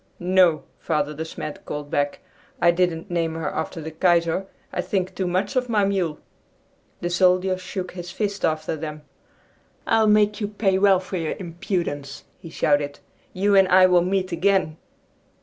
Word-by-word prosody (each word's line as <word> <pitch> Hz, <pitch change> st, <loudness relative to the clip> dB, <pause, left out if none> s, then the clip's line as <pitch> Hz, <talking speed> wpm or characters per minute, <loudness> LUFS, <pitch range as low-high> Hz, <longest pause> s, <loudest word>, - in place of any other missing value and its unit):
"No," 180 Hz, -3 st, +3 dB, 0.2 s
Father 150 Hz, -2 st, -1 dB
De 155 Hz, +2 st, -4 dB
Smet 155 Hz, -1 st, -7 dB
called 145 Hz, -1 st, -6 dB
back, 145 Hz, 0 st, -1 dB, 0.4 s
"I 170 Hz, -, +5 dB
didn't 175 Hz, +1 st, -1 dB
name 165 Hz, -2 st, -1 dB
her 160 Hz, -2 st, -3 dB
after 160 Hz, +1 st, -4 dB
the 160 Hz, 0 st, -6 dB
Kaiser. 170 Hz, +2 st, +1 dB, 0.3 s
I -, -, 0 dB
think 190 Hz, -2 st, -2 dB
too 185 Hz, -1 st, -2 dB
much 185 Hz, +5 st, -1 dB
of 250 Hz, -1 st, 0 dB
my 210 Hz, -3 st, +2 dB
mule!" 185 Hz, -6 st, -1 dB, 0.8 s
The 175 Hz, -, -1 dB
soldier 185 Hz, +1 st, +3 dB
shook 185 Hz, 0 st, -6 dB
his 175 Hz, -1 st, -8 dB
fist 200 Hz, +1 st, -3 dB
after 155 Hz, 0 st, 0 dB
them. 155 Hz, -1 st, -7 dB, 0.8 s
"I'll 220 Hz, -1 st, +3 dB
make 210 Hz, 0 st, +3 dB
you 205 Hz, -, 0 dB
pay 200 Hz, -2 st, 0 dB
well 195 Hz, -2 st, +5 dB
for 185 Hz, 0 st, -5 dB
your 165 Hz, -2 st, -2 dB
impudence!" 170 Hz, -5 st, -4 dB, 0.2 s
he 170 Hz, -, -10 dB
shouted. 145 Hz, -2 st, 0 dB, 0.3 s
"You 200 Hz, +2 st, +1 dB
and 195 Hz, -1 st, +6 dB
I 185 Hz, 0 st, +6 dB
will 180 Hz, -1 st, +5 dB
meet 185 Hz, +1 st, -1 dB
again!" 170 Hz, -2 st, +1 dB
180 Hz, 165 wpm, -23 LUFS, 160-190 Hz, 0.8 s, and